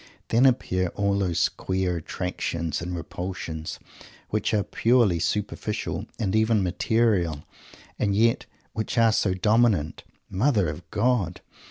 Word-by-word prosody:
Then 120 +4 +5
appear 95 -7 +1
all 100 0 +1
those 90 -2 +2
queer 95 -2 -2
attractions 85 -1 -3
and 90 +1 -4
repulsions 85 -2 -5 0.5
which 105 - 0
are 105 -2 +2
purely 115 -8 +2
superficial, 105 +3 -2
and 105 -3 -1
even 110 -2 +3
material, 90 -4 +1 0.6
and 100 -2 +1
yet 115 +2 +2 0.3
which 110 +2 -3
are 115 -1 +5
so 95 -3 +1
dominant. 105 -6 +2 0.2
Mother 105 - +1
of 80 +3 -8
God! 105 -6 0
100 Hz, 125 wpm, -25 LUFS, 90-110 Hz, 0.6 s, Then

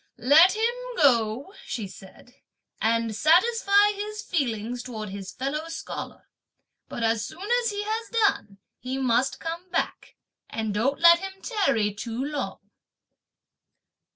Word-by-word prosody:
"Let 300 - +6
him 455 +2 +1 0.2
go," 255 - +2
(she 220 -5 -4
said), 190 +6 -15 0.5
"and 230 0 +1
satisfy 405 - +4
his 420 +1 -6
feelings 240 - -2
towards 220 -5 -7
his 195 -1 -7
fellow 295 +5 -3
scholar; 330 - -7 0.6
but 235 - -4
as 225 -1 +1
soon 365 +6 -7 0.2
as 465 - +1
he 410 0 -3
has 440 +2 -3
done, 410 - +1 0.2
he 255 +3 -4
must 255 0 +1
come 335 +3 -6
back; 345 - -3 0.3
and 220 -2 -3
don't 250 +7 0
let 340 0 +8
him 385 +1 -6
tarry 275 - +1
too 225 +3 -6
long." 255 -9 -5
275 Hz, 130 wpm, -26 LUFS, -, 0.6 s, let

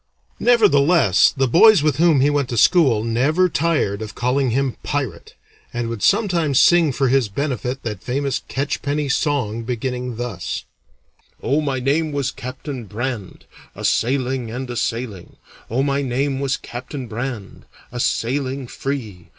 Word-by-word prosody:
Nevertheless, 170 - +4
the 135 0 +2
boys 180 - +6
with 150 -3 +1
whom 160 -4 +4
he 145 +2 +3
went 140 -3 0
to 120 - -3
school 130 - +4
never 135 +11 +2
tired 150 - 0
of 110 0 -7
calling 125 +2 +1
him 130 +1 0
"Pirate," 130 -12 -4 0.4
and 120 -1 -3
would 115 -3 -5
sometimes 170 - +2
sing 170 -4 +5
for 135 +1 0
his 130 -4 +2
benefit 130 +1 -3
that 105 -4 -5
famous 135 +2 -2
catchpenny 145 +1 -2
song 130 -6 0
beginning 125 +1 -3
thus: 120 +1 -4 0.8
Oh, 145 +3 +1
my 140 -3 -1
name 150 +5 0
was 140 -3 -1
Captain 130 0 -7
Brand, 110 -1 -5 0.3
A - - -5
sailing, 130 -1 0
And 125 +3 -5
a - - -5
sailing; 115 -6 -4 0.3
Oh, 125 +4 0
my 140 0 0
name 135 +1 -1
was 140 -1 0
Captain 130 +2 -7
Brand, 115 -2 -6 0.3
A 120 - -6
sailing 130 +3 -1
free. 115 -10 -5
130 Hz, 150 wpm, -20 LUFS, 120-145 Hz, 0.8 s, boys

